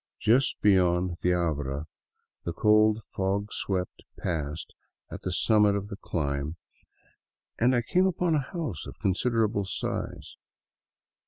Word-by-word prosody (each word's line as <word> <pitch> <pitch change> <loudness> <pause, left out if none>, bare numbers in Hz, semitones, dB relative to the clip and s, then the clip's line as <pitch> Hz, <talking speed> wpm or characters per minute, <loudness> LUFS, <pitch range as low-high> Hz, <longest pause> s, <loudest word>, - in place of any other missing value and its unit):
Just 125 +5 +3
beyond 90 -3 +3
the 90 0 +3
abra, 75 -4 -1 0.6
the 85 - -3
cold, 110 +3 +4
fog 100 +2 -1
swept 90 -2 -2 0.2
pass 75 -2 -3 0.5
at - - -7
the 95 - -3
summit 105 +2 +4
of 100 0 -3
the 100 - -5
climb, 75 -4 -2 1.0
I 120 0 +3
came 185 +10 +3
upon 180 -2 +1
a 155 - +3
house 140 - -4
of - - -9
considerable 105 +1 +1
size. 95 - -4
100 Hz, 120 wpm, -28 LUFS, 85-110 Hz, 1.0 s, cold